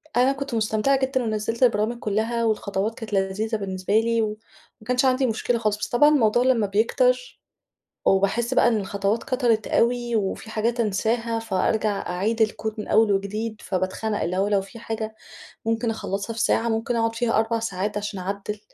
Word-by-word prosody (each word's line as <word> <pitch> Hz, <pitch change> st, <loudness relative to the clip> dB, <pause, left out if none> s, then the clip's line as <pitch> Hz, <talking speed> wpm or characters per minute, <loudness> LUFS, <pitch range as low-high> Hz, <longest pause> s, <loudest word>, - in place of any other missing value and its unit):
أنا 255 Hz, +2 st, +4 dB
كنت 275 Hz, -2 st, -5 dB
مستمتعة 220 Hz, +5 st, +1 dB
جدًا 265 Hz, -1 st, 0 dB
ونَزّلت 220 Hz, +2 st, -1 dB
البرامج 235 Hz, 0 st, +2 dB
كلها 225 Hz, +3 st, -1 dB
والخطوات 210 Hz, 0 st, -1 dB
كانت 215 Hz, -2 st, -7 dB
لذيذة 200 Hz, +3 st, 0 dB
بالنسبة 195 Hz, +1 st, 0 dB
لي 230 Hz, 0 st, +1 dB
و -, -, +2 dB, 0.5 s
وما 215 Hz, -, -17 dB
كانش 250 Hz, +1 st, +2 dB
عندي 260 Hz, +1 st, +3 dB
مشكلة 235 Hz, +1 st, 0 dB
خالص، 215 Hz, -2 st, 0 dB
بس -, -, -3 dB
طبعًا 295 Hz, +5 st, +5 dB
الموضوع 240 Hz, -4 st, +3 dB
لما 235 Hz, -5 st, +2 dB
بيكتر 250 Hz, +5 st, +1 dB, 0.7 s
وباحس 200 Hz, +6 st, +2 dB
بقى 240 Hz, -, +5 dB
إن 230 Hz, -, +2 dB
الخطوات 200 Hz, +2 st, -1 dB
كَترت 240 Hz, -4 st, +1 dB
أوي، 240 Hz, 0 st, +1 dB
وفي 210 Hz, +2 st, -2 dB
حاجات 230 Hz, +2 st, 0 dB
انساها، 230 Hz, +2 st, 0 dB
فأرجع 215 Hz, -1 st, -1 dB
أعيد 210 Hz, +6 st, -1 dB
الكود 215 Hz, 0 st, -1 dB
من 210 Hz, -, -5 dB
أول 220 Hz, -1 st, +4 dB
وجديد 210 Hz, +3 st, -2 dB
فباتخنق، 190 Hz, +3 st, -2 dB
اللي 175 Hz, +2 st, -1 dB
هو 195 Hz, +2 st, +1 dB
لو 200 Hz, -2 st, +2 dB
في 195 Hz, +5 st, -11 dB
حاجة 220 Hz, -1 st, -4 dB, 0.5 s
ممكن 225 Hz, +1 st, 0 dB
اخلصها 210 Hz, 0 st, -4 dB
في 225 Hz, -, -5 dB
ساعة، 230 Hz, +1 st, +2 dB
ممكن 230 Hz, +2 st, -1 dB
أقعُد 225 Hz, 0 st, +1 dB
فيها 230 Hz, -1 st, +1 dB
4 225 Hz, +1 st, +1 dB
ساعات 210 Hz, -1 st, -3 dB
عشان 205 Hz, -2 st, -4 dB
اعدّل، 200 Hz, +2 st, -4 dB
220 Hz, 175 wpm, -24 LUFS, 205-235 Hz, 0.7 s, طبعًا